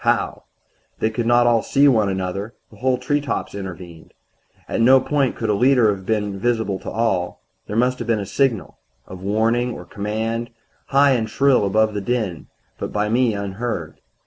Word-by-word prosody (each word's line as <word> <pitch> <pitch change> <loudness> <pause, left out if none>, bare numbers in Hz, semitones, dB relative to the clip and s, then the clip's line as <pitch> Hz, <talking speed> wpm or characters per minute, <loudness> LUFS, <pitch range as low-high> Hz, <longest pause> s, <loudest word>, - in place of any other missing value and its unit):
How? - - 0 0.5
They 110 - 0
could 115 +1 -2
not 120 0 +4
all 120 -1 +4
see 140 +1 +3
one 110 -7 +3
another 95 +3 -4 0.2
whole 125 +4 0
treetops 145 +3 -2
intervened. 90 -4 -9 0.5
At - - -1
no 130 +3 +7
point 140 -1 0
could 110 -2 -1
a - - +2
leader 120 -1 +4
have 95 -1 -13
been 105 -3 -1
visible 110 -4 0
to - - -7
all. 100 -6 -1 0.2
There 105 - -5
must 125 +2 +1
have 120 - -5
been 115 -1 +2
a 100 - -3
signal 110 - -1 0.3
of 95 -1 -10
warning 115 +5 +1
or 90 - -9
command, 110 +5 -3 0.4
high 140 +1 +4
and 115 -4 0
shrill 135 -7 +3
above 110 +2 +2
the 105 - -3
din, 100 -6 -2 0.3
but - - -4
by 105 0 0
me 120 -1 +2
unheard. 100 -4 -4
110 Hz, 175 wpm, -21 LUFS, 100-125 Hz, 0.5 s, no